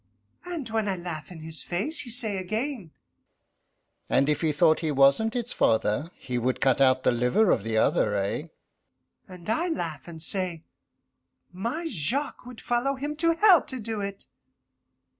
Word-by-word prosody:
And 340 -8 -5
when 220 -2 0
I 190 - +1
laugh 175 -2 -6
in 165 -3 -10
his 160 0 -3
face, 210 - -2
he 250 - -4
say 220 -4 +2
again, 215 - -3 1.2
"And 140 +2 +3
if 150 -1 0
he 160 -2 +2
thought 160 +1 +3
he 160 - -2
wasn't 140 - +3
its 245 0 -3
father, 110 +7 +1
he 125 -1 -3
would 125 +2 -1
cut 135 0 +2
out 130 -1 +4
the - - +4
liver 125 - +2
of - - +2
the 110 0 -1
other 105 -1 +2
eh?" 100 +11 -2 0.8
And 180 -3 -12
I 275 +11 0
laugh, 165 - -4
and 165 -2 -9
say, 170 0 0 0.9
"My 235 - -3
Jacques 255 - -2
would 250 -2 -10
follow 245 +3 0
him 290 +3 -4
to 335 +1 +3
hell 370 -2 +6
to 260 - -3
do 220 -1 -3
it." 200 0 -5
185 Hz, 170 wpm, -26 LUFS, 150-245 Hz, 1.2 s, hell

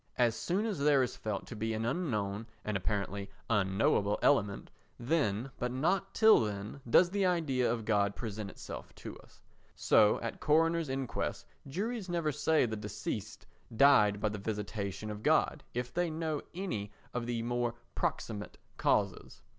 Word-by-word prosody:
As 120 -2 +3
soon 185 - -1
as 205 -8 -2
there 140 -2 +4
is 125 - -3
felt 105 -2 -4
to 115 - -8
be 110 +1 -2
an 110 +1 -2
unknown 115 - -2 0.2
and 105 - -2
apparently 100 +1 -2 0.2
unknowable 100 0 +2
element, 105 -8 +2 0.3
then, 125 -3 0
but 125 0 -1
not 180 +9 0
till 220 -1 +7
then, 105 +4 -4
does 175 +9 +6
the 200 0 +1
idea 135 -9 +1
God 100 -2 +1
present 110 -3 -5
itself - - -9
to - - -8
us. - - -20 0.3
So 105 -1 +4
at 115 - -4
coroners' 165 0 +2
inquests 130 - -3 0.2
juries 205 - -3
never 170 -3 0
say 155 0 +2
the 110 -2 -3
deceased 105 0 -5 0.3
died 105 -7 +6
by 110 - +1
the 105 0 -5
visitation 105 0 -4
of 105 0 -7
God - - +2
if 125 0 -3
they 175 0 +1
know 155 -2 -2
any 110 - -3 0.2
of 120 -1 -3
the 115 -1 -1
more 120 0 -1 0.2
proximate 105 -2 -3 0.2
causes. - - 0
115 Hz, 155 wpm, -32 LUFS, 105-155 Hz, 0.3 s, till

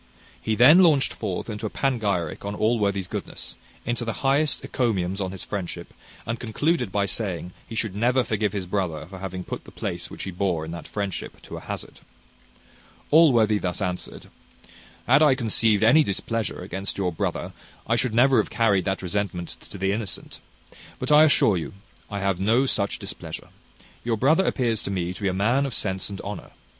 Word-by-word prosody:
He 110 - 0
then 135 +10 +8
launched 155 -7 +4
forth 100 -5 -4
into 110 -1 -4
a - - -5
panegyric 100 - -1
on 100 0 -3
Allworthy's 100 -4 +1
goodness; - - -5 0.3
into 120 0 -1
the 115 +3 -4
highest 140 +2 +2
encomiums 95 -6 0
on 95 -1 -2
his 95 - -7
friendship; 90 -3 -5 0.3
and 115 0 -3
concluded 125 - 0
by 100 0 +1
saying, 90 -2 -3
he 115 - -7
should 110 -3 -1
never 125 +4 +3
forgive 110 -3 0
his 95 -2 -3
brother 90 -5 -2
for 95 +2 -10
having 95 -1 -5
put - - -6
the - - -13
place - - -4
which - - -7
he 95 - -4
bore 90 -3 -1
in 80 - -7
that 85 -1 -7
friendship 100 -3 -4
to - - -8
a - - -5
hazard. - - -7 1.1
Allworthy 120 -10 +5
thus 90 -2 -2
answered: 90 -3 -4 0.7
"Had 135 +4 +5
I 150 -4 +6
conceived 110 -3 +3
any 130 +8 +7
displeasure 110 -2 -2
against 95 +1 -4
your 95 -2 0
brother, 80 - -3 0.3
I 115 - +2
should 120 -2 0
never 130 +2 +5
have 110 - +2
carried 100 -5 +2
that 95 -1 -1
resentment 90 -2 -2 0.2
to - - -8
the 95 +1 0
innocent: 105 -2 -4 0.6
but - - -3
I 150 +1 +8
assure 110 -9 +4
you 80 - -5 0.4
I 100 -2 -4
have 95 -2 0
no 115 +7 +3
such 100 -6 0
displeasure. - - -7 0.5
Your 115 -1 0
brother 155 - +3
appears 115 -4 +1
to - - -5
me 90 -2 -2
to - - -11
be 100 - +1
a - - +2
man 120 +9 +2
of 130 - -5
sense 95 -1 -2
and 100 -1 -6
honour. 100 -2 -6
105 Hz, 190 wpm, -25 LUFS, 95-120 Hz, 1.1 s, then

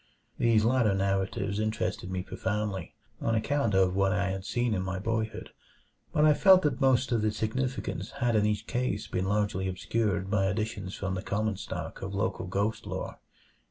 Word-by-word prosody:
These 115 -2 +4
latter 115 -4 +3
narratives 100 +1 0
interested 110 -4 -2
me 95 -1 -2
profoundly, 95 -2 -3 0.3
on 115 - +1
account 115 -2 +1
of 95 -1 +3
what 95 0 +3
I 100 -1 +1
had 95 0 -4
seen 120 -2 0
in 95 - 0
my 95 0 -3
boyhood, 110 +2 -2 0.6
but 150 - +3
I 155 - +7
felt 190 +3 +6
that 145 -3 0
most 130 -1 +3
of 115 -2 +2
the 110 0 +2
significance 125 +5 -2
had 120 -3 +1
in 105 - +4
each 105 0 -1
case 120 -5 -1
been 90 0 -2
largely 100 -1 0
obscured 95 0 -1
by 100 -2 +2
additions 105 -1 -2
from 95 -1 -3
the 95 - -2
common 105 0 -1
stock 90 -5 -6
of 95 +1 -4
local 100 -1 -1
ghost 105 +4 -1
lore. - - -5
105 Hz, 180 wpm, -29 LUFS, 95-115 Hz, 0.6 s, I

